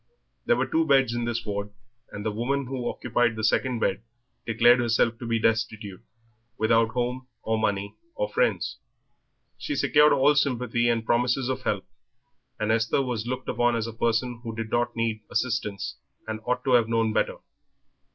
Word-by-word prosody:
There 485 - +5
were - - 0
two 160 0 +1
beds 135 -4 +4
in 120 0 -2
this 120 0 -2
ward, 100 0 -3 0.4
and 105 +1 -7
the 110 - 0
woman 130 +6 -1
who 125 -1 -3
occupied 120 -1 0
the 110 - -5
second 125 +3 +1
bed 95 - 0 0.5
declared 120 +2 +5
herself 115 -1 +1
to 120 - -6
be 115 0 +1
destitute, 110 -3 -1 0.6
without 115 +1 +3
home, 125 +2 -3 0.2
or 110 0 0
money, 100 -2 -1 0.2
or - - -1
friends. - - 0 0.8
She 295 - -3
secured 150 - +4
all 140 +3 +5
sympathy 125 -4 +1
and 115 -1 0
promises 125 +2 +1
of 130 0 -2
help, 105 -6 -2 0.7
and 110 0 0
Esther 115 +4 +2
was 120 -3 -3
looked 130 +1 -4
upon 120 0 +1
as 115 -1 -1
a 115 - -6
person 115 +1 0
who 115 -2 -6
did 115 -1 -5
not 120 0 0
need 115 -2 -1
assistance 110 -4 -2 0.3
and 110 0 -4
ought 125 - 0
to 135 - 0
have 120 -2 +4
known 115 -1 +1
better. - - 0
120 Hz, 175 wpm, -26 LUFS, 110-125 Hz, 0.8 s, There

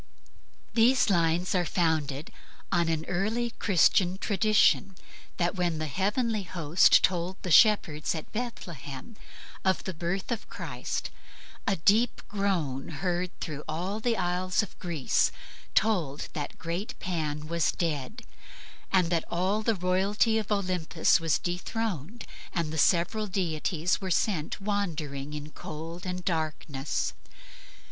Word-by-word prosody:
These 235 0 +4
lines 170 0 +2
are 180 -2 +2
founded 160 -4 0 0.4
on 170 -1 +2
an 160 -1 -1
early 220 +7 -1
Christian 185 -1 +3
tradition 205 -2 +3 0.4
that 175 0 +1
when 175 -3 0
the 155 - -2
heavenly 210 - 0
host 170 -3 +4
told 180 +1 +1
the 180 - -3
shepherds 170 -7 +5
at 155 - -7
Bethlehem 190 - -6 0.5
of 190 0 +2
the 190 - -4
birth 175 +6 -3
of 230 - -3
Christ, - - -4 0.6
a 200 - +3
deep 210 +8 +3
groan, 175 -10 -1
heard 180 +3 -2
through 150 -2 -5
all 180 +7 -2
the 230 0 0
isles 180 +3 +1
of 205 - -10
Greece, 165 -7 +1 0.4
told 175 -10 +1
that 145 -2 -3
the - - -20
great 175 +5 -4
Pan 155 -4 -2
was 170 0 +1
dead, 165 - -3 0.7
and 180 -3 +3
that 165 -2 +2
all 190 +5 +1
the 225 0 +1
royalty 195 +5 +2
of 215 -1 -5
Olympus 180 -5 +2
was 165 -2 +2
dethroned 190 - -3 0.3
and 165 -3 -1
the 160 - -2
several 190 +7 +3
deities 175 -1 0
were 190 - -3
sent 175 -3 0
wandering 155 -9 -2
in 150 +1 -7
cold 165 +5 -7
and 180 0 -4
darkness. 155 -4 -2
180 Hz, 130 wpm, -28 LUFS, 160-200 Hz, 0.7 s, shepherds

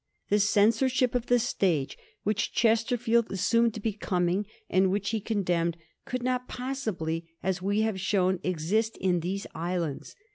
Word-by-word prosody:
The 205 - +3
censorship 230 +5 +3
of 245 -1 -1
the 245 - +4
stage 190 - 0 0.3
which 205 0 0
Chesterfield 230 0 +2
assumed 230 +4 +2
to - - -4
be 215 0 -1
coming, 185 0 0 0.2
and 190 0 +3
which 200 +2 -1
he 220 -2 -1
condemned, 175 -6 0 0.3
could 250 -1 -3
not 250 0 -1
possibly, 205 -11 -3
as 190 -1 -1
we 200 +3 +1
have 220 -3 0
shown, 190 -1 +1
exist 185 +6 0
in 180 -2 +1
these 190 +4 -3
islands. 170 -3 -3
205 Hz, 150 wpm, -28 LUFS, 180-230 Hz, 0.3 s, the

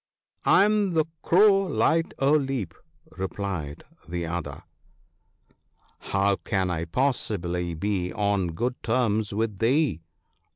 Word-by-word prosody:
1 - - +4
1 - - +7
am 210 -2 +2
the 160 -2 +2 0.2
Crow 195 +2 +5
Light 165 -3 +1
o' 135 +1 +2
Leap/ 135 - 0 0.5
replied 95 -6 -4 0.3
the 85 0 -3
other. 85 +2 -5 0.7
' - - -39
How 100 0 +2
can 95 -2 -1
I 85 -1 -2
possibly 90 -6 -1
be 90 +1 -2
on 100 -5 0
good 125 +8 -3
terms 110 -4 0
with 105 -1 -2
thee 130 - +2
100 Hz, 125 wpm, -26 LUFS, 90-135 Hz, 0.7 s, 1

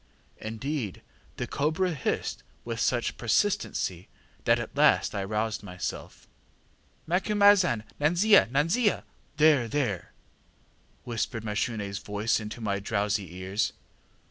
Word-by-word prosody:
Indeed, 115 - -4 0.3
the - - -2
cobra 160 +5 0
hissed 135 -5 -2 0.2
with 115 -1 -4
such 120 0 0
persistency 115 - 0 0.4
that - - +5
at - - -6
last - - +4
I 100 - -2
roused 105 +2 -2
myself. 90 -3 -6 0.8
ŌĆ£ŌĆś_Macumazahn, 190 - +4 0.2
nanzia, 175 - +5
nanzia!_ŌĆÖ 165 - +2 0.3
(there, 150 -6 +5
there!) 115 -7 -2 0.9
whispered 115 -1 -3
MashuneŌĆÖs 105 -2 -2
voice 105 +3 0
into 105 +2 -7
my 100 -3 -1
drowsy 100 -3 -1
ears. 95 +3 -1
115 Hz, 105 wpm, -28 LUFS, 105-155 Hz, 0.9 s, that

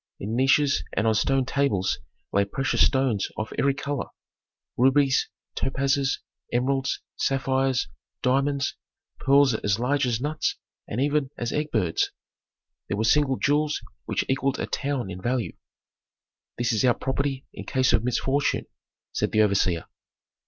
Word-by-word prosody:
In 105 +4 -3
niches 135 +3 +3
and 110 - 0
on 110 - +4
stone 135 +4 +2
tables 130 -9 +1 0.3
lay 100 - +4
precious 130 +7 +1
stones 130 -7 +1
of 110 - -4
every 140 0 +3
color: 140 -1 -3 0.7
rubies, 135 +2 +3 0.3
topazes, 135 0 0 0.3
emeralds, 135 +2 0 0.2
sapphires, 135 -1 +1 0.4
diamonds, 140 +2 +1 0.4
pearls 140 -1 +5
as 100 -2 0
large 130 +3 +1
as 115 -2 0
nuts 150 +3 -1 0.3
and 110 - -3
even 145 0 +1
as 120 -1 -2
birds' 150 0 -1 0.4
eggs. - - -22 0.8
There 100 - -2
were 110 - +1
single 135 +3 +3
jewels 150 +1 +1 0.3
which - - -1
equalled 135 0 0
a - - -2
town 135 -8 -2
in 90 0 -7
value. 120 +2 -1 1.0
"This 120 0 +1
is 110 - +1
our 125 -2 +4
property 135 0 -2
in - - -8
case 130 -2 +2
of 110 - +3
misfortune," 135 +3 0 0.5
said - - 0
the 110 - +4
overseer. 95 -5 +1
135 Hz, 140 wpm, -25 LUFS, 120-140 Hz, 1.0 s, pearls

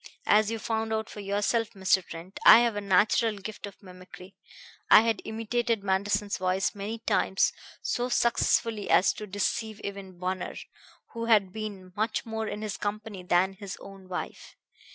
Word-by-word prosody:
"As 210 0 +4
you 225 - -2
found 220 0 -2
out 220 0 -2
for - - -9
yourself, 205 +3 0
Mr. 190 -1 +2
Trent, 170 +3 -10
I 230 - +10
have 235 -3 +1
a 205 - -2
natural 205 +3 +2
gift 205 +1 -7
of 200 - -14
mimicry. 185 0 -13 0.6
I - - +9
had 225 -1 0
imitated 225 0 -1
Manderson's 200 +1 0
voice 185 +1 0
many 205 +3 -5
times 195 -3 +1 0.3
so 245 +1 -1
successfully 230 -3 +1
as 185 - +4
to 210 - -8
deceive 205 +2 -2
even 195 -2 -7
Bunner, 185 +1 -3 0.6
who 230 0 -4
had 205 -5 +3
been 200 -4 -7
much 220 +2 -1
more 220 -1 -3
in 210 0 -5
his 210 -2 -4
company 210 -1 -4
than 180 +2 +2
his 195 0 -8
own 195 -1 -13
wife. 180 - -6
205 Hz, 165 wpm, -28 LUFS, 190-220 Hz, 0.6 s, I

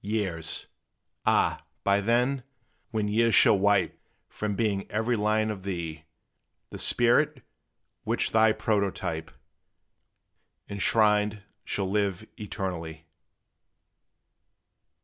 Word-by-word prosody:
Years! 100 -6 -2 0.6
Ah, - - +2 0.2
but 100 +1 +1
then, 125 +3 +2 0.5
when 110 -2 -1
years 115 +2 +3
shall 100 - +6
wipe 100 -1 +2 0.3
From 105 -1 -3
being 100 -2 -1
every 115 +3 0
line 110 0 +1
of 100 -3 -7
thee, 85 -5 -5 0.7
The - - -7
spirit, 130 +3 +3 0.6
which - - 0
thy 110 0 +5
prototype 100 -7 -1 1.4
Enshrined, 105 0 +2 0.2
shall 100 -2 -2
live 100 0 -1
eternally! 85 -6 -5
105 Hz, 90 wpm, -27 LUFS, 95-110 Hz, 1.4 s, shall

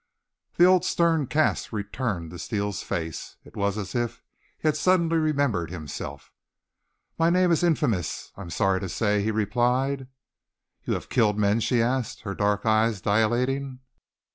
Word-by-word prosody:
The 175 - +7
old 185 0 +5
stern 165 -5 +2
cast 155 +4 +1
returned 105 -5 -3
to 90 - -9
Steele's 100 +1 -3
face. 80 -2 -5
It - - -17
was 100 0 0
as 100 -3 -5
if 120 -1 -2 0.3
he - - -2
had 155 - +3
suddenly 165 0 +2
remembered 140 - +1
himself. 80 -5 -7 0.9
"My 165 +1 +4
name 180 0 +3
is 165 - +3
infamous, 120 - 0
I 100 - -10
am 90 - -8
sorry 95 +5 +1
to 95 - -5
say," 105 +2 +1
he 105 - 0
replied. 125 +5 0 0.8
"You - - 0
have - - -6
killed 105 -4 +2
men?" 105 +1 +2
she 115 0 +2
asked, 125 0 -2
her 100 -3 -4
dark 105 +3 0
eyes 110 -1 +2
dilating. 125 +6 0
115 Hz, 160 wpm, -25 LUFS, 100-140 Hz, 0.9 s, The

